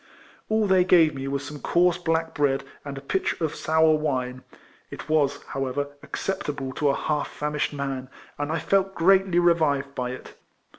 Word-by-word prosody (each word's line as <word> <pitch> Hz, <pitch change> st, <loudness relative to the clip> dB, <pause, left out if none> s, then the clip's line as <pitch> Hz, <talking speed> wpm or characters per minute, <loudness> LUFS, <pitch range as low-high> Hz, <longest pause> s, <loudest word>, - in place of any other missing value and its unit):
All 220 Hz, 0 st, +2 dB
they 190 Hz, -2 st, +4 dB
gave 170 Hz, -4 st, +5 dB
me 135 Hz, 0 st, -5 dB
was 140 Hz, 0 st, -2 dB
some 145 Hz, +1 st, -8 dB
coarse 175 Hz, +2 st, +2 dB
black 165 Hz, -1 st, -1 dB
bread, 135 Hz, -2 st, +1 dB, 0.2 s
and 140 Hz, -1 st, -6 dB
a -, -, -6 dB
pitcher 165 Hz, +2 st, -1 dB
of 150 Hz, -, -3 dB
sour 160 Hz, 0 st, +3 dB
wine. 130 Hz, -5 st, -1 dB, 0.5 s
It -, -, -9 dB
was, 145 Hz, -2 st, +1 dB
however, 135 Hz, +1 st, -2 dB
acceptable 145 Hz, -8 st, -4 dB
to 145 Hz, +1 st, +1 dB
a 140 Hz, -, +2 dB
half 150 Hz, -1 st, -1 dB
famished 150 Hz, 0 st, -2 dB
man; 135 Hz, -2 st, -4 dB, 0.3 s
and 145 Hz, +1 st, -2 dB
I 160 Hz, -, 0 dB
felt 195 Hz, +4 st, +1 dB
greatly 190 Hz, +1 st, +4 dB
revived 155 Hz, -5 st, +2 dB
by 125 Hz, -2 st, -3 dB
it. 125 Hz, -, -8 dB
150 Hz, 170 wpm, -25 LUFS, 140-170 Hz, 0.5 s, gave